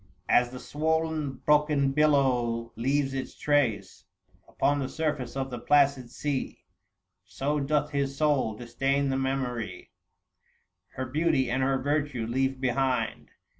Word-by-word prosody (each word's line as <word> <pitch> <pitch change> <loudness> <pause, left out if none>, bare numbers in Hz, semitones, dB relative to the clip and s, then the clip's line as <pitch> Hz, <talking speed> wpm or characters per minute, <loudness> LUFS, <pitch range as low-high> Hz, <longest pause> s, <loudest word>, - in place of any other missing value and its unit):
As 120 0 +4
the 130 - -8
swoll'n, 155 -1 -2
broken 150 -2 +3
billow 125 -6 +2
leaves 135 +3 0
its 135 -1 -5
trace 115 -10 0 0.4
Upon 145 0 +1
the 135 - -2
surface 145 -6 -2
of 135 -1 -3
the 120 - -5
placid 140 -2 +3
sea, 135 +1 -4 0.6
So 145 +2 -2
doth 145 +1 0
his 140 -1 -1
soul 145 -8 +1
distain 135 +4 -1
the 135 - 0
memory 130 -4 -3 1.0
Her 130 - -3
beauty 130 -2 +1
and 130 +1 0
her 135 0 +2
virtue 145 -3 -1
leave 130 +3 -1
behind. 130 -2 -1
135 Hz, 130 wpm, -28 LUFS, 125-145 Hz, 1.0 s, As